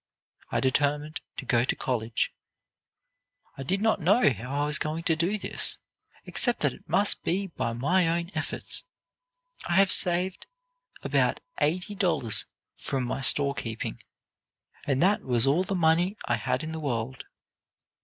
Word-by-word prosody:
I -, -, 0 dB
determined 145 Hz, +3 st, 0 dB, 0.2 s
to 135 Hz, -, -5 dB
go 120 Hz, -1 st, +2 dB
to 130 Hz, -, 0 dB
college. 115 Hz, -3 st, -2 dB, 1.2 s
"I -, -, -8 dB
did 190 Hz, +9 st, -1 dB
not 220 Hz, -2 st, +2 dB
know 185 Hz, -, +4 dB
how 130 Hz, +7 st, -3 dB
I -, -, +1 dB
was 150 Hz, 0 st, +2 dB
going 155 Hz, +2 st, -3 dB
to 165 Hz, -1 st, +2 dB
do 175 Hz, +6 st, 0 dB
this, -, -, +1 dB, 0.5 s
except 245 Hz, -2 st, +1 dB
that -, -, +1 dB
it 195 Hz, -, -17 dB
must 205 Hz, +1 st, +2 dB
be 195 Hz, +3 st, 0 dB
by 115 Hz, -, -2 dB
my 165 Hz, +9 st, +2 dB
own 170 Hz, +2 st, -1 dB
efforts. -, -, -5 dB, 0.9 s
I 170 Hz, -, +1 dB
had 195 Hz, +1 st, +5 dB
saved 180 Hz, -, +4 dB, 0.6 s
about -, -, +1 dB, 0.2 s
eighty 180 Hz, +6 st, 0 dB
dollars 155 Hz, -, +1 dB, 0.3 s
from 135 Hz, -2 st, -2 dB
my 125 Hz, +2 st, -3 dB
store 140 Hz, +2 st, +4 dB
keeping, 115 Hz, -, -5 dB, 0.9 s
and 135 Hz, +1 st, +2 dB
that 205 Hz, +3 st, +3 dB
was 120 Hz, -1 st, +2 dB
all 145 Hz, +6 st, +3 dB
the 195 Hz, -, -3 dB
money 175 Hz, +4 st, +2 dB
I 120 Hz, -, 0 dB
had 110 Hz, -, -2 dB
in 155 Hz, -, -5 dB
the 160 Hz, -, -5 dB
world. 125 Hz, -3 st, -3 dB
155 Hz, 155 wpm, -27 LUFS, 130-185 Hz, 1.2 s, had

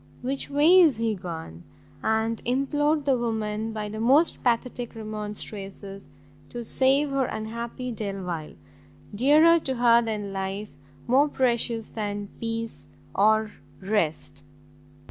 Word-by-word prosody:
which 270 Hz, +2 st, -3 dB
way 305 Hz, +6 st, +6 dB
is 310 Hz, -10 st, +5 dB
he 225 Hz, -1 st, 0 dB
gone?" 165 Hz, -, -7 dB, 0.4 s
and 220 Hz, +1 st, 0 dB
implored 290 Hz, +4 st, +1 dB
the 275 Hz, -2 st, +3 dB
woman 220 Hz, -2 st, -2 dB
by 215 Hz, -1 st, -4 dB
the 215 Hz, +1 st, -6 dB
most 275 Hz, +9 st, +3 dB
pathetic 240 Hz, 0 st, -1 dB
remonstrances, 210 Hz, -2 st, -7 dB, 0.4 s
to 240 Hz, -1 st, -6 dB
save 275 Hz, +4 st, +2 dB
her 275 Hz, -1 st, +1 dB
unhappy 235 Hz, +3 st, -5 dB
Delvile, 190 Hz, -7 st, -5 dB, 0.6 s
dearer 305 Hz, +9 st, +5 dB
to 265 Hz, -4 st, -3 dB
her 235 Hz, -1 st, +5 dB
than 210 Hz, -3 st, -3 dB
life, 195 Hz, +2 st, -4 dB, 0.4 s
more 275 Hz, +5 st, +4 dB
precious 235 Hz, -4 st, 0 dB
than 205 Hz, -2 st, -4 dB
peace 230 Hz, 0 st, -4 dB, 0.3 s
or 215 Hz, +1 st, +3 dB, 0.3 s
rest! 155 Hz, -8 st, -2 dB
225 Hz, 120 wpm, -26 LUFS, 205-260 Hz, 0.6 s, way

